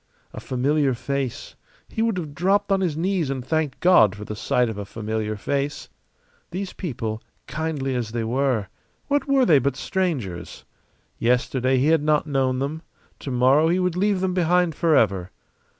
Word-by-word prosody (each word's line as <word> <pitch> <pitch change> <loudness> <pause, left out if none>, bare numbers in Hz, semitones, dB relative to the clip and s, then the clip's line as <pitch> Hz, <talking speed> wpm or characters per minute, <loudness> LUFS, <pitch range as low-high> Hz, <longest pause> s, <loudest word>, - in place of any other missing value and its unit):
A - - -6
familiar 135 +1 +1
face 135 0 -4 0.3
he 220 - -4
would 225 -4 +1
have 155 -5 -5
dropped 195 +6 +1
on 195 0 +3
his 165 -5 -1
knees 175 -3 0
and 130 -2 -3
thanked 155 -2 -1
God 140 - +5
for 105 0 -8
the 105 - -5
sight 125 +3 +1
of 110 -2 -5
a - - -3
familiar 110 +1 -3
face. 140 +7 -3 0.6
These 190 +1 -5
people, 115 - -4 0.2
kindly 150 -3 -3
as 120 -3 -2
they 115 0 -2
were 120 -4 0 0.4
what 285 -1 +1
were 275 -2 +4
they 155 - +6
but 135 0 -1
strangers? 130 - -3 0.5
Yesterday 125 +2 +1
he 135 +4 +2
had 160 -2 +4
not 150 0 +2
known 135 -3 0
them; 140 +4 -3 0.4
to - - -6
morrow 130 +5 +4
he 175 +2 +2
would 180 -2 0
leave 195 0 +1
them 190 -1 0
behind 180 -1 +2
forever. 110 - +2
140 Hz, 170 wpm, -23 LUFS, 125-175 Hz, 0.6 s, they